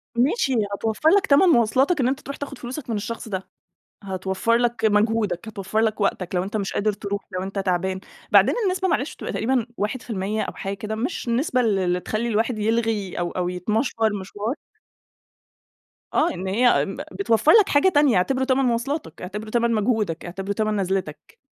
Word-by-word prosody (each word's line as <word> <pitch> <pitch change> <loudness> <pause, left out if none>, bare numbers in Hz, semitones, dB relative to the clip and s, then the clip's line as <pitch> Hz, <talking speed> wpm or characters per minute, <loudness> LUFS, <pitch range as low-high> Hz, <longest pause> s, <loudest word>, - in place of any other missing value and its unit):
ماشي 270 - +2 0.2
هتوفر 220 +8 +1
لك 395 +2 +4
تمن 285 +7 +5
مواصلاتك 265 +3 +3
إن 250 - +2
أنت 265 +1 0
تروح 280 - -7
تاخد 285 - -6
فلوسك 255 +2 -7
من 225 - 0
الشخص 225 +3 -5
ده. 190 -2 -4 0.6
هتوفر 190 +3 -1
لك 240 -1 0
مجهودك، 215 -2 +1
هتوفر 205 0 -3
لك 220 -1 0
وقتك 190 -2 -1
لو 180 - +2
أنت 200 +3 -4
مش 200 -2 -2
قادر 210 +1 +1
تروح، 200 0 -4
لو 185 0 -3
أنت 195 +1 -5
تعبان. 185 0 -1 0.3
بعدين - - +6
النسبة 375 0 0
معلش 310 -3 -1
بتبقى - - -6
تقريبًا 245 0 0
1% 210 -2 -2
أو - - -4
حاجة 195 +1 -4
كده 215 +2 -5
مش 245 +4 -3
النسبة 250 +2 +1
ال 220 -5 +2
اللي 180 -1 0
تخلّي 220 +5 -2
الواحد 225 +1 0
يلغي 220 -2 0
أو 175 -1 -1
أو 180 -1 -2
يتمشور 215 +3 0
مشوار 205 +5 -4 1.6
آه، - - +3
إن 185 +1 -5
هي 240 +6 +3
م 195 - -6
بتوفر 220 +8 +3
لك 430 -4 +6
حاجة 290 +6 +4
تانية، 290 - +4
اعتبره 260 +9 +1
تمن 265 0 +2
مواصلاتك، 255 +6 -2
اعتبره 210 +4 -6
تمن 235 0 +1
مجهودك، 215 -6 0
اعتبره 195 +3 -4
تمن 215 0 0
نزلتك. 190 -5 -3
220 Hz, 180 wpm, -23 LUFS, 195-245 Hz, 1.6 s, بعدين